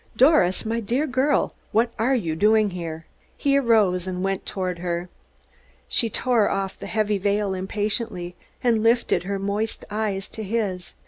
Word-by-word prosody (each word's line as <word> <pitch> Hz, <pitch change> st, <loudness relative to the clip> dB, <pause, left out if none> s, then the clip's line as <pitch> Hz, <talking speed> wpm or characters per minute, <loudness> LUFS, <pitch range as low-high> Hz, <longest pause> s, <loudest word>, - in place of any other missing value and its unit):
"Doris, 245 Hz, -, +4 dB
my 230 Hz, +1 st, -1 dB
dear 240 Hz, +7 st, 0 dB
girl, 275 Hz, +1 st, +1 dB, 0.2 s
what 230 Hz, +2 st, +2 dB
are 255 Hz, +4 st, +3 dB
you 165 Hz, -10 st, -1 dB
doing 210 Hz, +3 st, +3 dB
here?" 165 Hz, -2 st, -6 dB, 0.3 s
He 280 Hz, -1 st, +2 dB
arose 215 Hz, -9 st, +3 dB
and 185 Hz, 0 st, -3 dB
went 195 Hz, 0 st, -2 dB
toward 185 Hz, -2 st, -3 dB
her. 175 Hz, 0 st, -3 dB, 0.8 s
She 230 Hz, -, +1 dB
tore 230 Hz, -2 st, +2 dB
off 195 Hz, -1 st, -2 dB
the -, -, -7 dB
heavy 210 Hz, -2 st, 0 dB
veil 200 Hz, 0 st, 0 dB
impatiently, 190 Hz, -1 st, -2 dB, 0.3 s
and 230 Hz, -3 st, +3 dB
lifted 230 Hz, -6 st, +2 dB
her 200 Hz, +1 st, -2 dB
moist 200 Hz, +3 st, -2 dB
eyes 205 Hz, -2 st, -2 dB
to 220 Hz, -, -8 dB
his. 200 Hz, -4 st, -3 dB
205 Hz, 155 wpm, -24 LUFS, 185-230 Hz, 0.8 s, Doris